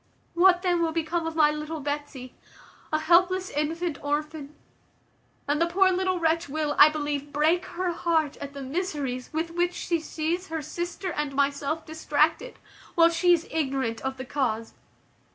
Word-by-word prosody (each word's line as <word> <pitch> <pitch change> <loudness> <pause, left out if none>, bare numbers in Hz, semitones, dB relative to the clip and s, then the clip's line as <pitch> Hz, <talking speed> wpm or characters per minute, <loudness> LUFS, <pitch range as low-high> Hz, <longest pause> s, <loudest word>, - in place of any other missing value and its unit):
What 360 +1 +5
then 350 -2 +2
will 330 -1 +1
become 330 +1 -1
of 325 - -5
my 300 -2 +5
little 305 +1 -5
Betsy, 285 -3 -5 0.6
a 310 - +2
helpless 365 +4 +3
infant 315 +2 -2
orphan? 300 0 -3 0.9
and 295 +2 +1
the 335 - +4
poor 375 +2 +3
little 370 0 0
wretch 330 -1 +1
will, 300 0 -1
I 295 - +10
believe, 290 -1 -3
break 315 +5 +2
her 365 0 -2
heart 325 -4 0
at 280 0 -7
the 280 -1 -7
miseries 275 -4 -3
with 320 +2 -2
which 350 +1 0
she 340 -1 -1
sees 325 +3 -3
her 320 -1 -4
sister 350 +4 -4
and 295 -2 -3
myself 280 +3 0
distracted, 320 +9 0 0.4
while 335 0 +6
she 335 +2 +3
is 335 -2 +2
ignorant 270 -7 -1
of 265 0 -3
the 260 - -6
cause. 230 -5 -2
315 Hz, 165 wpm, -26 LUFS, 290-345 Hz, 0.9 s, I